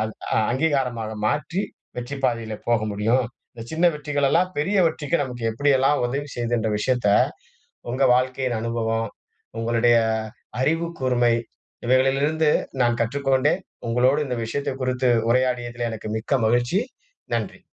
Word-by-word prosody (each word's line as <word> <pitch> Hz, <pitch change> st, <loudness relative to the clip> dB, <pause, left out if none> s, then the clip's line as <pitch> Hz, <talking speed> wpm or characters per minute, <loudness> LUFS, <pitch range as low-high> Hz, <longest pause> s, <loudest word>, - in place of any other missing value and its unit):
அங் 110 Hz, 0 st, -4 dB, 0.4 s
அங்கீகாரமாக 125 Hz, -5 st, 0 dB
மாற்றி 150 Hz, -, -1 dB, 0.4 s
வெற்றிப் 135 Hz, +3 st, -5 dB
பாதையில 115 Hz, -3 st, 0 dB
போக 120 Hz, -2 st, +3 dB
முடியும், 115 Hz, +5 st, +1 dB, 0.3 s
இந்த 115 Hz, -, -9 dB
சின்ன 165 Hz, +2 st, 0 dB
வெற்றிகளெல்லாம் 150 Hz, +4 st, +1 dB
பெரிய 195 Hz, +8 st, 0 dB
வெற்றிக்கு 155 Hz, 0 st, 0 dB
நமக்கு 125 Hz, -3 st, -6 dB
எப்படியெல்லாம் 135 Hz, +3 st, +2 dB
உதவி 140 Hz, +4 st, -2 dB
செய்துன்ற 120 Hz, -2 st, 0 dB
விஷயத்த 125 Hz, 0 st, 0 dB, 0.8 s
உங்க 130 Hz, +3 st, +1 dB
வாழ்க்கையின் 130 Hz, -1 st, 0 dB
அனுபவம், 115 Hz, -1 st, -1 dB, 0.5 s
உங்களுடைய 115 Hz, +1 st, +3 dB, 0.6 s
அறிவுக்கூர்மை 130 Hz, -6 st, +1 dB, 0.5 s
இவைகளிலிருந்து 135 Hz, +5 st, +3 dB, 0.3 s
நான் 120 Hz, 0 st, +2 dB
கற்றுக்கொண்டேன். 135 Hz, -, +1 dB, 0.3 s
உங்களோடு 130 Hz, +5 st, +3 dB
இந்த 125 Hz, -2 st, -2 dB
விஷயத்தக் 135 Hz, +3 st, -3 dB
குறித்து 125 Hz, 0 st, +1 dB, 0.2 s
உரையாடியதிலே 120 Hz, -1 st, 0 dB
எனக்கு 110 Hz, -1 st, -6 dB
மிக்க 120 Hz, +5 st, -2 dB
மகிழ்ச்சி. 120 Hz, -, +2 dB, 0.5 s
நன்றி. -, -, -3 dB
125 Hz, 115 wpm, -23 LUFS, 120-140 Hz, 0.8 s, போக